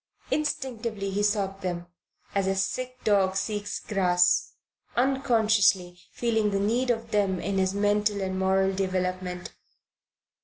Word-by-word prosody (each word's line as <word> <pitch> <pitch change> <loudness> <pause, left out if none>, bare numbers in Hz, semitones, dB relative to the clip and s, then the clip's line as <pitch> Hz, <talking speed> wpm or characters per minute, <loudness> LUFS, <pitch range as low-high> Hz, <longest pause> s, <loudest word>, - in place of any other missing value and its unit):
Instinctively 230 -9 -2
he 200 +2 -1
sought 200 -2 0
them, 175 -2 -3 0.5
as 195 -1 +1
a 195 - +1
sick 255 +6 -3
dog 195 -3 +3
seeks 205 +1 -2
grass, 180 -3 +2 0.4
unconsciously 220 -8 +2
feeling 220 -3 +1
the 200 -1 0
need 235 +6 +1
of 230 -1 -1
them 195 -3 +1
in 195 +1 -1
his 190 +1 +1
mental 205 0 +1
and 190 -1 -2
moral 190 0 +2
development. 185 -1 -2
200 Hz, 125 wpm, -27 LUFS, 190-220 Hz, 0.5 s, dog